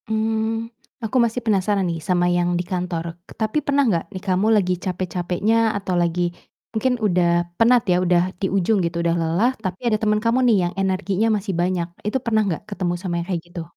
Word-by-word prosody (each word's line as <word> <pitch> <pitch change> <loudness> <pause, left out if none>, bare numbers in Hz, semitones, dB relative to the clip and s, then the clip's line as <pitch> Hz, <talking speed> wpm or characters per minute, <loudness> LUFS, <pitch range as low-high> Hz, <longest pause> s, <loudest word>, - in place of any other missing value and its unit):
Mmm. 220 +1 -1 0.3
Aku 225 +3 -1
masih 235 0 +2
penasaran 200 -3 +1
nih 165 - -2
sama 175 +2 +1
yang 175 0 +1
di 175 - 0
kantor, 175 -2 -4 0.2
tapi 215 +5 0
pernah 280 -3 +2
enggak, 170 -5 0
nih 185 - -6
kamu 195 +4 +2
lagi 185 -4 +2
capek-capeknya 185 +5 0
atau 190 -3 -2
lagi 175 0 +1 0.4
mungkin 250 +2 0
udah 175 -3 +2
penat 235 -2 +4
ya, 180 - +4
udah 175 -1 +4 0.2
di 190 0 -2
ujung 195 0 +2
gitu, 170 0 -2
udah 170 0 +1
lelah, 170 +9 +2
tapi 185 -1 -5
ada 215 - +2
temen 215 0 +1
kamu 230 +3 +2
nih 230 -4 +5
yang - - -11
energinya 195 +2 0
masih 200 -4 -2
banyak, 175 -1 0 0.2
itu 210 +5 0
pernah 220 -3 +1
gak 160 - -9
ketemu 185 -4 -2
sama 175 -3 -2
yang 170 0 -3
kayak 170 - -2
gitu? 175 -1 -6
190 Hz, 195 wpm, -22 LUFS, 175-220 Hz, 0.4 s, nih